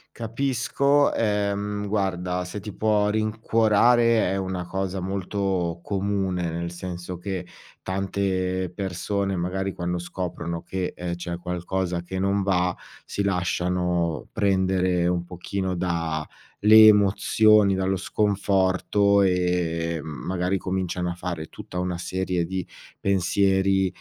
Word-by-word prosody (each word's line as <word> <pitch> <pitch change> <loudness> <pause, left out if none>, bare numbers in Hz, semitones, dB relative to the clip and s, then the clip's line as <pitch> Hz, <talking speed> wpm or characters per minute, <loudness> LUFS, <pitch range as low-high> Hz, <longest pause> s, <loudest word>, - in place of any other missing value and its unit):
Capisco, 135 +4 +1
ehm, 105 -1 -1
guarda, 90 -3 -1
se 90 +3 -6
ti 105 0 -8
può 105 -1 +2
rincuorare 110 +1 +3
è 95 - 0
una 95 -2 -3
cosa 95 0 -2
molto 95 -2 -2
comune, 95 -3 -1
nel 85 +1 -3
senso 90 0 -6
che 90 -1 -5 0.3
tante 95 -1 -1
persone, 95 +1 -2
magari 95 +2 -2
quando 90 -1 -3
scoprono 85 -1 -5
che, 95 -1 -3
ehm, 85 -1 -4
c'è 85 0 -5
qualcosa 90 0 -2
che 95 +2 -5
non 100 +1 +1
va, 90 -2 +1 0.3
si 100 - -2
lasciano 90 -2 0
prendere 95 -3 +2
un 90 -1 0
pochino 90 +1 -4
da 85 -3 -2 0.4
le 110 +1 +9
emozioni, 105 0 +5
dallo 95 0 0
sconforto, 100 0 +2
ehm, 85 -3 0
magari 90 +6 -2
cominciano 90 -1 -2
a - - -2
fare 85 -2 -5
tutta 90 - -8
una 90 -1 -2
serie 90 0 -1
di 95 +1 -4 0.3
pensieri, 95 0 +2
95 Hz, 115 wpm, -25 LUFS, 90-100 Hz, 0.4 s, le